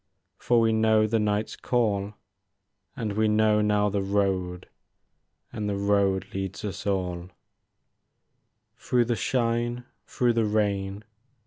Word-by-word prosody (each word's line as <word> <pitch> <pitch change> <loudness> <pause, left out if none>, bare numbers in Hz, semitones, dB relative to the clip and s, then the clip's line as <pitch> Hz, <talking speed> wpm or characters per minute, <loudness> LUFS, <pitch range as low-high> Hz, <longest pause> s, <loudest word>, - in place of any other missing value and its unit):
For 120 -1 +2
we 115 -1 +3
know 110 -1 +3
the 110 +1 +1
night's 105 0 -1
call, 105 -4 -1 0.8
And 110 -3 -3
we 110 +1 +2
know 105 0 +3
now 105 0 +2
the 100 0 -1
road 95 -2 -1 0.9
And 105 -1 -3
the 100 - -2
road 100 -1 +1
leads 95 +1 -4
us 100 0 -5
all. 90 -3 -2 1.5
Through 120 -1 +1
the 120 0 0
shine, 120 0 -1 0.2
through 120 -1 +1
the 115 -1 +1
rain. 100 -1 -1
105 Hz, 125 wpm, -26 LUFS, 100-110 Hz, 1.5 s, we